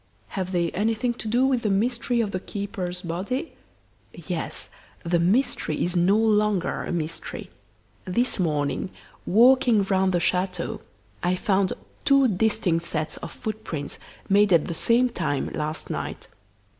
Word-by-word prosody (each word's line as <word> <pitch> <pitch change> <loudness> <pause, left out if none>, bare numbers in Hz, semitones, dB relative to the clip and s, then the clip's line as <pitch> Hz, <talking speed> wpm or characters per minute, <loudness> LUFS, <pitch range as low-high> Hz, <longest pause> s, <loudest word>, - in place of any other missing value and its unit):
"Have 185 -2 -3
they 170 -2 0
anything 225 +4 0
to 230 - -7
do 240 +4 +3
with 260 -3 +2
the 215 - 0
mystery 235 +4 +1
of 210 -3 -2
the 185 - -2
keeper's 190 -3 -5
body?" 195 - -3 0.6
"Yes; - - -5 0.3
the 170 0 +1
mystery 185 - +1
is 175 +1 -2
no 180 +4 +4
longer 210 -4 +2
a - - -4
mystery. 165 -2 -4 0.5
This 235 +5 +1
morning, 150 +1 0 0.4
walking 240 0 +5
round 190 -1 +2
the 175 - +2
chateau, 180 0 -1 0.4
I 180 +1 +1
found 190 -1 +1 0.3
two 275 -1 +5
distinct 200 -5 +1
sets 155 -2 -3
of - - -7
footprints, 215 - -5 0.3
made 200 0 +4
at 165 -4 +5
the - - -3
same 235 +9 +4
time, 155 - -2
last 155 +1 -3
night. - - -5
195 Hz, 145 wpm, -25 LUFS, 175-225 Hz, 0.6 s, walking